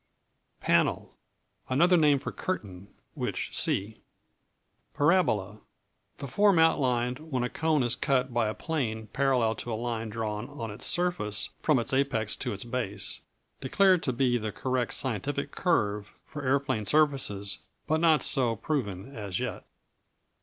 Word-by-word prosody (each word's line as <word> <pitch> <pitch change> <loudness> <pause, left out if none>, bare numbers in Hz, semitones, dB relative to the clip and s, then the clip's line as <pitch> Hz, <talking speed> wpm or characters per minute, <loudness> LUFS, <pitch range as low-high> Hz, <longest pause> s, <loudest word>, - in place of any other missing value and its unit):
P - - -15
Panel - - +2 0.5
Another 170 +8 +4
name 150 -4 +5
for 135 - -5
Curtain 100 - -5 0.3
which - - -3
see. 105 +3 0 0.9
Parabola 125 - +2 0.6
The - - -6
form 200 +8 +3
outlined 125 -6 +2
when 145 -6 -3
a 125 - -1
cone 155 -3 +1
is 120 0 +2
cut 130 -1 0
by 120 -2 +2
a 110 - -3
plane 110 -9 -3
parallel 130 -5 +2
to 120 - -5
a - - -1
line 115 -1 -3
drawn 110 +1 -4
on 115 -7 -6
its 105 - -5
surface 170 - -1
from 155 -4 +3
its 120 +2 -1
apex 130 -6 +1
to 125 - -3
its 100 -2 -5
base. 115 -5 -3 0.4
Declared 185 +6 +3
to 130 - 0
be 120 -1 +1
the 110 -1 -3
correct 125 +4 -1
scientific 140 +4 -2
curve 105 - 0
for 145 - -7
aeroplane 130 -4 0
surfaces, 135 -10 +2 0.3
but 155 +1 +1
not 160 -3 +4
so 120 -4 +1
proven, 115 -3 -3
as 100 -5 -3
yet. - - -4
125 Hz, 145 wpm, -28 LUFS, 110-145 Hz, 0.9 s, name